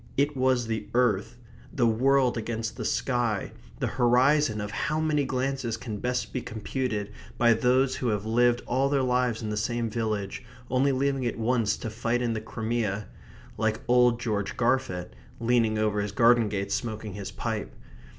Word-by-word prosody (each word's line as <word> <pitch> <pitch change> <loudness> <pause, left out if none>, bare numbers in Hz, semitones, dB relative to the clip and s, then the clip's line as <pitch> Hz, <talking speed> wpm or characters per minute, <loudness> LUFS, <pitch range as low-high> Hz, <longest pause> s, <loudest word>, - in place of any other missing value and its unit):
It 145 +2 +2
was 130 -2 +2
the 110 -2 -3
earth; 120 -6 +1 0.3
the 125 - +1
world 130 +3 +3
against 115 0 -3
the - - -5
sky; 120 -5 0 0.3
the - - -1 0.2
horizon 125 0 +4
of 105 0 -4
how 155 +6 -1
many 155 -2 +1
glances 130 -3 -2
can 110 -2 -5
best 125 +2 -2
be 125 - -2
computed 110 -1 -3 0.3
by 120 -1 +5
those 125 +3 +2
who 125 - -2
have 105 -2 -1
lived 120 +2 +2
all 135 +3 +1
their 140 -2 +2
lives 125 -2 +1
in 105 - -3
the 105 - -2
same 115 +1 -1
village, 105 -3 -2 0.3
only 135 +2 +3
leaving 135 0 0
it 120 -2 -2
once 115 -1 +1
to 110 - -5
fight 115 +2 -1
in 120 -1 0
the 110 - -3
Crimea, 110 -2 -2 0.5
like 110 0 0
old 125 -1 +4
George 105 -4 -2
Garfit, 115 -8 0 0.3
leaning 115 -2 +2
over 105 -1 +1
his 100 0 -3
garden 115 +1 +4
gate 100 -1 -3
smoking 110 -3 -3
his 100 0 -6
pipe. - - -4
120 Hz, 170 wpm, -27 LUFS, 110-125 Hz, 0.5 s, by